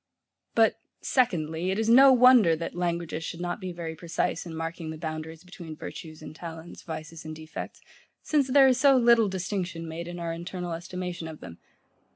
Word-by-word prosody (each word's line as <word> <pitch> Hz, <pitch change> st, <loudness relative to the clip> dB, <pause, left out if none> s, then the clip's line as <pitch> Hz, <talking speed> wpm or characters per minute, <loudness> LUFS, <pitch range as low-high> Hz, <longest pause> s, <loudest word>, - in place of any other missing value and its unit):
But, 225 Hz, -1 st, +4 dB, 0.2 s
Secondly, 170 Hz, -, 0 dB
it 190 Hz, -, 0 dB
is 220 Hz, 0 st, 0 dB
no 265 Hz, +4 st, +8 dB
wonder 250 Hz, -9 st, +6 dB
that 165 Hz, +1 st, -5 dB
languages 170 Hz, -2 st, -2 dB
should 165 Hz, -, -6 dB
not 175 Hz, +2 st, -3 dB
be 185 Hz, -1 st, -4 dB
very 170 Hz, -2 st, -5 dB
precise 170 Hz, +1 st, -2 dB
in 165 Hz, -, -7 dB
marking 165 Hz, 0 st, -5 dB
the 160 Hz, -, -6 dB
boundaries 160 Hz, 0 st, -6 dB
between 175 Hz, -3 st, -10 dB
virtues 155 Hz, 0 st, -9 dB
and 155 Hz, -, -9 dB
talents, 165 Hz, 0 st, -9 dB
vices 160 Hz, 0 st, -7 dB
and 155 Hz, 0 st, -7 dB
defects; 155 Hz, 0 st, -8 dB, 0.4 s
since 295 Hz, -4 st, +2 dB
there 270 Hz, +1 st, +6 dB
is 255 Hz, -1 st, +3 dB
so 275 Hz, 0 st, +6 dB
little 235 Hz, -3 st, +5 dB
distinction 185 Hz, -3 st, -3 dB
made 165 Hz, +1 st, -6 dB
in 175 Hz, 0 st, -6 dB
our 170 Hz, -1 st, -3 dB
internal 175 Hz, +1 st, -5 dB
estimation 175 Hz, 0 st, -5 dB
of 160 Hz, -1 st, -9 dB
them. 85 Hz, -1 st, -11 dB
170 Hz, 185 wpm, -27 LUFS, 160-195 Hz, 0.4 s, no